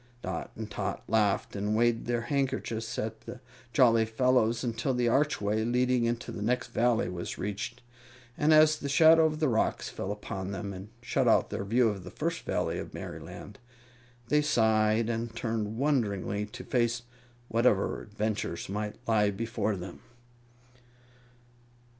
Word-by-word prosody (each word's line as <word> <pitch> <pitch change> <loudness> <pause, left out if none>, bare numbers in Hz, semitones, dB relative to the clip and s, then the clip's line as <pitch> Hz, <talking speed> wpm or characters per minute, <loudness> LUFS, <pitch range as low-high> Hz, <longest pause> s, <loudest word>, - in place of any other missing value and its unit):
Dot - - -4
and 110 -1 -7
Tot - - -3
laughed 105 -3 +1
and 105 +1 -1
waved 120 0 +2
their 120 -1 0
handkerchiefs 130 -3 -2
at 110 0 -4
the 125 - -9 0.3
jolly 115 -4 +5
fellows 115 +1 +2
until 125 +2 -1
the 120 -1 +1
archway 110 -5 +1
leading 125 +1 +2
into 120 +1 -2
the - - -6
next 120 +3 0
Valley 120 -1 +2
was 90 -1 -5
reached, 105 +5 -4 0.5
and 150 +1 +2
as 155 0 +6
the 140 - -4
shadow 160 +3 +6
of 155 -1 -4
the 155 - +2
rocks 115 -3 0
fell 95 - -4
upon 95 -2 -5
them 100 0 -4
and 95 +2 -9
shut - - +1
out - - +3
their - - -3
view 115 +4 +3
of 100 -4 -3
the - - -8
First - - -3
Valley - - -1
of - - -7
Merryland, 90 +3 -8 0.7
they 150 0 +4
sighed 110 -4 +2
and 115 0 -3
turned 110 -2 -2
wonderingly 105 -7 0
to 125 +4 -9
face 120 -1 0 0.4
whatever 115 -4 +2
adventures 105 -5 -3
might 105 +1 -3
lie 105 -2 +3
before 110 +1 -2
them. 90 -1 -8
115 Hz, 155 wpm, -29 LUFS, 105-125 Hz, 0.7 s, as